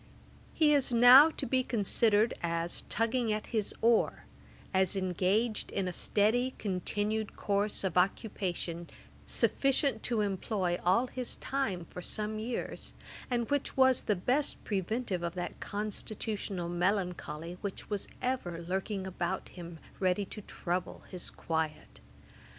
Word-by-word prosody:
Ætat - - -25
39.] - - -24
He 300 -2 +5
is 275 -3 +2
now 250 +6 +10
to 310 - -4
be 260 -1 +2
considered 220 -1 +3
as 170 0 -1
'tugging 230 +1 +1
at 215 0 -1
his 215 -3 +1
oar,' 230 -1 +3 0.5
as 190 0 +3
engaged 195 +4 +1
in 195 -2 -1
a 180 - -3
steady 235 +8 +1
continued 205 +2 -2
course 205 0 0
of 190 -3 -1
occupation, 180 -3 -1 0.4
sufficient 275 +1 +2
to 235 -3 +1
employ 190 -2 -1
all 190 +8 +4
his 250 -1 -4
time 220 -11 -2
for 180 - -8
some 215 +3 -2
years; 235 +2 -4 0.4
and 240 -2 0
which 285 -1 -1
was 260 -1 +5
the 210 - +1
best 255 +11 0
preventive 200 -1 -1
of 170 +1 -3
that 180 - -4
constitutional 205 -3 -3
melancholy 175 -2 -2
which 200 +1 -6
was 205 -2 -2 0.2
ever 250 -10 -1
lurking 190 +3 -3
about 185 0 -3
him, 170 -2 -9 0.2
ready 185 +1 +1
to 210 - -8
trouble 180 -2 -4
his 180 -2 -4
quiet. 160 - -3
205 Hz, 140 wpm, -31 LUFS, 180-230 Hz, 0.5 s, now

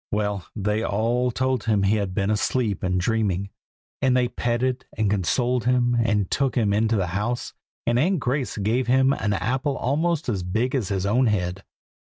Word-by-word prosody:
Well, 105 -3 -2
they 105 +1 -1
all 115 +4 +1
told 130 -1 -1
him 105 -3 +2
he 100 +3 +3
had 100 -3 -3
been 100 0 +1
asleep 110 0 0
and 90 -1 0
dreaming; 100 -2 0 0.5
and 130 -1 +3
they 125 -1 +2
petted 125 +2 -1
and 105 -2 +1
consoled 120 +6 0
him, 125 -1 +2
and 105 -4 0
took 135 -2 0
him 110 -5 +2
into 110 +2 +2
the 95 -3 +1
house, 115 +5 -2 0.3
and 120 +1 +2
Aunt 180 +5 +2
Grace 130 -1 -2
gave 110 +5 0
him 130 +2 +4
an 105 -7 -1
apple 130 +7 -1
almost 160 +4 0
as 105 -6 -1
big 110 +8 -1
as 125 -8 0
his 100 -2 -1
own 120 +5 +3
head. 95 -2 -1
115 Hz, 185 wpm, -24 LUFS, 100-125 Hz, 0.5 s, him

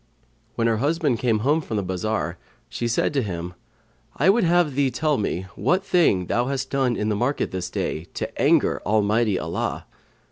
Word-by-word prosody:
When 115 - 0
her 115 -1 +2
husband 145 -1 0
came 115 -4 +1
home 150 +3 +3
from 110 -7 -4
the 100 - -1
bazar, 95 +4 -2 0.3
she 120 - -3
said 115 +5 0
to 140 - +2
him, 90 -4 -5 0.6
"I 190 - +5
would 230 +2 +2
have 175 -3 +3
thee 140 0 +2
tell 150 0 0
me 95 -3 -2
what 180 - +1
thing 155 - +3
thou 120 +7 0
hast 135 -1 -3
done 130 -3 +1
in 105 0 -1
the 105 - +1
market 125 +7 -1
this 95 -1 -4
day, 80 - -3
to - - -4
anger - - +3
Almighty 105 0 +2
Allah." - - -3
120 Hz, 185 wpm, -23 LUFS, 105-145 Hz, 0.6 s, I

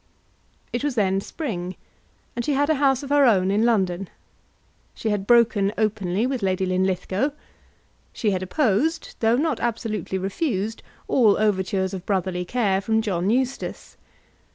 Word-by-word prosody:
It 240 - -2
was 290 -3 -1
then 195 -3 +1
spring, 185 - -5 0.6
and 240 - -2
she 290 - 0
had 285 +3 +2
a 295 -2 0
house 270 -1 +3
of 280 - -7
her 290 0 +5
own 195 -5 +3
in 210 +2 +2
London. 190 -5 +1 0.9
She 220 - -2
had 200 -1 -2
broken 230 -4 +4
openly 210 -1 0
with 260 -2 -2
Lady 190 -1 0
Linlithgow. 190 +7 0 0.8
She 215 -4 -1
had 185 -1 -1
opposed, 265 - 0
though 225 +1 +3
not 300 -2 0
absolutely 225 -4 -2
refused, 200 - -2 0.3
all 220 -6 +4
overtures 190 -2 0
of 185 -2 -5
brotherly 185 -2 -1
care 200 -3 +1
from 220 +1 +1
John 190 -3 -1
Eustace. 260 +3 -2
210 Hz, 150 wpm, -23 LUFS, 190-245 Hz, 0.9 s, her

